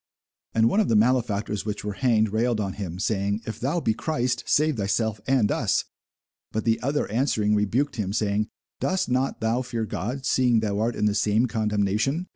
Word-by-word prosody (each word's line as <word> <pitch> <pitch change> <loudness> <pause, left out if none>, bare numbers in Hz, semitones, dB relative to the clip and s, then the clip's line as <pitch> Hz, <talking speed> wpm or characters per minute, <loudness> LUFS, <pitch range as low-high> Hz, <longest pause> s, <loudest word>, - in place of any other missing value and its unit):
And 115 0 +4
one 200 - +2
of 215 - +3
the 115 - +3
malefactors 110 -3 +1
which 105 -1 -4
were 105 - -2
hanged 110 -2 +2
railed 115 0 +1
on 100 -3 -2
him, 90 -4 -5
saying, 100 +1 -1
If 110 - -6
thou 145 +8 0
be 115 -8 +1
Christ, 125 -2 -1
save 150 -2 +2
thyself 105 +1 -1
and 130 -6 +3
us. - - +1 0.7
But 110 0 -2
the 115 -1 +2
other 140 +3 0
answering 110 -3 +1
rebuked 115 +8 0
him, 100 -3 -2
saying, 105 0 0 0.3
Dost 185 0 0
not 130 0 0
thou 115 +3 +1
fear 120 -3 -3
God, 125 +6 -4
seeing 125 -3 +3
thou 105 -2 -1
art 115 +2 0
in - - 0
the 105 - +2
same 105 +3 +2
condemnation? 110 - 0
110 Hz, 190 wpm, -25 LUFS, 105-125 Hz, 0.7 s, And